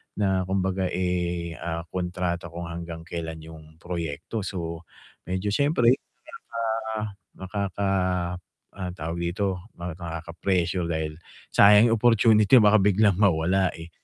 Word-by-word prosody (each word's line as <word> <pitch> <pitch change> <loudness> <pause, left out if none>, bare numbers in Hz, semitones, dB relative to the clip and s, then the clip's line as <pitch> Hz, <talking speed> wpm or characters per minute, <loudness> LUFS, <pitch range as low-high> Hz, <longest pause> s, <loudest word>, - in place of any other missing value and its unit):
na 95 -2 +1
kumbaga, 95 -1 0
eh, 85 -2 -1
ah, 85 0 -3
kontrata 90 -1 -2
kung 85 0 -6
hanggang 85 -1 -6
kelan 80 -1 -5
yung 80 -1 -13
proyekto. 85 +4 -4
So, 85 -3 -5 0.4
medyo 95 +3 -1
siyempre, 135 -3 +4 0.8
ah, 110 -2 -4 0.2
nakaka 100 0 -2 0.8
ah, 90 -2 -5
tawag 85 -1 -5 0.2
dito, 95 -2 -2
nakaka-pressure 85 +1 -2
dahil 80 -1 -2 0.3
sayang 105 +3 +7
opportunity 110 -2 +4
baka 105 +1 +6
biglang 100 -1 +3
mawala, 95 -1 +3
eh. 80 +1 -10
90 Hz, 110 wpm, -25 LUFS, 85-100 Hz, 0.8 s, sayang